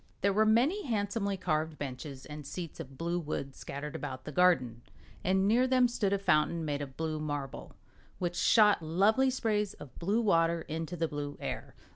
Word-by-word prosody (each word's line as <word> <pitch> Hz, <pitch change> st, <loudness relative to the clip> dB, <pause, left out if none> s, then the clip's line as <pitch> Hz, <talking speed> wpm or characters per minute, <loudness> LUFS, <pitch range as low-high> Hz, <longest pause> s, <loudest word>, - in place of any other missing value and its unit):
There 200 Hz, 0 st, +3 dB
were 215 Hz, +2 st, +4 dB
many 275 Hz, -, +3 dB
handsomely 205 Hz, -2 st, -1 dB
carved 155 Hz, -3 st, -1 dB
benches 135 Hz, 0 st, -6 dB
and 150 Hz, 0 st, -8 dB
seats 165 Hz, +3 st, -7 dB
of 135 Hz, -4 st, -8 dB
blue 170 Hz, +1 st, -1 dB
wood 145 Hz, -4 st, -4 dB
scattered 145 Hz, +2 st, -6 dB
about 130 Hz, -2 st, -5 dB
the 150 Hz, -, -5 dB
garden, 135 Hz, -9 st, +3 dB, 0.4 s
and 190 Hz, +1 st, +2 dB
near 245 Hz, +5 st, +4 dB
them 255 Hz, -1 st, +4 dB
stood 215 Hz, -5 st, -1 dB
a 200 Hz, -, +3 dB
fountain, 165 Hz, -3 st, +2 dB
made 145 Hz, -1 st, -2 dB
of 135 Hz, -2 st, -7 dB
blue 160 Hz, -1 st, -2 dB
marble, 145 Hz, -3 st, -5 dB, 0.4 s
which 175 Hz, -1 st, -2 dB
shot 210 Hz, -1 st, +5 dB
lovely 200 Hz, +11 st, +3 dB
sprays 215 Hz, -5 st, 0 dB
of 145 Hz, -, -12 dB
blue 205 Hz, +7 st, +1 dB
water 165 Hz, -5 st, +3 dB
into 165 Hz, +2 st, -4 dB
the 165 Hz, 0 st, 0 dB
blue 145 Hz, -1 st, -5 dB
air. -, -, -5 dB
170 Hz, 180 wpm, -31 LUFS, 150-205 Hz, 0.4 s, shot